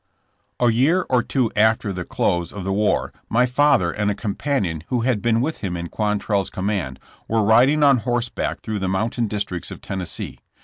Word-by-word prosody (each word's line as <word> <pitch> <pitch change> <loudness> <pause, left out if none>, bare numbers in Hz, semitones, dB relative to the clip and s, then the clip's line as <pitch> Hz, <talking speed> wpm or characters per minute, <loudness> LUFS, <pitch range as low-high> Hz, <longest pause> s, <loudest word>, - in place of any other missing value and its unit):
A 120 -1 +4
year 150 +11 +2
or 125 -1 +4
two 120 -1 0
after 110 -1 +2
the 90 -1 -4
close 85 -1 -1
of 100 - -7
the 95 +1 -1
war 105 +1 +1 0.2
my 125 +3 +3
father 125 -9 +3
and 105 +2 -1
a 100 - -1
companion 100 - -2
who 125 -2 0
had 120 -3 0
been 115 +1 +2
with 155 +5 -2
him 90 -3 -3
in 85 0 -5
Quantrell's 105 -2 -1
command, 95 -9 -3 0.3
were 110 -1 +1
riding 125 +8 +5
on 140 -2 +6
horseback 120 +1 -2
through 110 -2 -3
the 95 - -2
mountain 110 +4 -1
districts 100 -4 -4
of - - -8
Tennessee. 95 -3 -5
110 Hz, 185 wpm, -22 LUFS, 95-120 Hz, 0.3 s, on